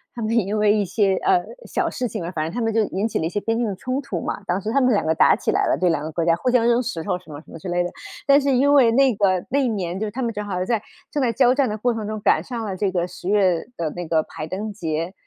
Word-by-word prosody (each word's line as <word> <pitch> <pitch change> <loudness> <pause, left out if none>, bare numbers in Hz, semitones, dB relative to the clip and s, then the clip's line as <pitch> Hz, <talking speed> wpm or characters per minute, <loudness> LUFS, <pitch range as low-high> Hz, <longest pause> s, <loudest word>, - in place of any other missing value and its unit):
他 240 - -5
们 220 +1 0
也 230 - +3
因 205 +2 -2
为 210 -1 +4
一 210 - +2
些， 195 0 +1
呃， 380 -2 +2 0.2
小 - - -1
事 250 - -2
情 215 -5 -5
啊， 170 - -4
反 155 -4 -2
正 160 - -3
他 240 - -4
们 225 -1 0
就 225 - +3
引 200 +2 -2
起 225 - -2
了 - - -1
一 - - -3
些 205 - -2
边 225 +2 -1
境 235 0 0
的 200 - -3
冲 255 +8 -3
突 195 -11 -4
嘛， - - -4
当 180 +2 0
时 210 +3 -3
他 275 +3 +2
们 255 -1 +3
两 200 - 0
个 160 - +2
打 - - +5
起 - - -1
来 - - +1
了， - - +2
对， 180 -1 +2
两 155 -3 -1
个 155 - -5
国 165 +1 -1
家 165 -1 +4
互 250 - -1
相 245 -2 +3
扔 240 +1 +3
石 220 -10 -4
头 180 -1 -2
什 180 - -20
么 145 - -7
什 - - -18
么 - - -9
之 170 - -8
类 175 0 +1
的。 175 - -4 0.3
但 280 +1 +5
是 280 0 +1
因 275 +3 +4
为 265 -5 +6
那 265 +1 +4
个 190 -3 +1
那 280 - +2
一 270 - +2
年 190 -5 -2
就 215 - -2
是 - - -5
他 260 +4 -4
们 230 -1 -1
正 210 - -4
好 185 -3 -3
在 225 0 0 0.3
正 290 - -1
在 245 -3 +2
交 250 +1 +4
战 265 -2 +1
的 210 - -3
过 245 +3 +1
程 220 -2 -4
中 215 0 -4
赶 - - +3
上 235 -3 -5
了 195 -3 -3
这 195 +1 0
个 175 -1 -1
十 180 0 -7
月 190 -5 +2
的 165 -3 -2
那 175 +1 -6
个 160 -1 +2
排 155 - -7
灯 205 +5 -4
节。 165 -2 -3
210 Hz, 360 characters per minute, -22 LUFS, 175-240 Hz, 0.3 s, 为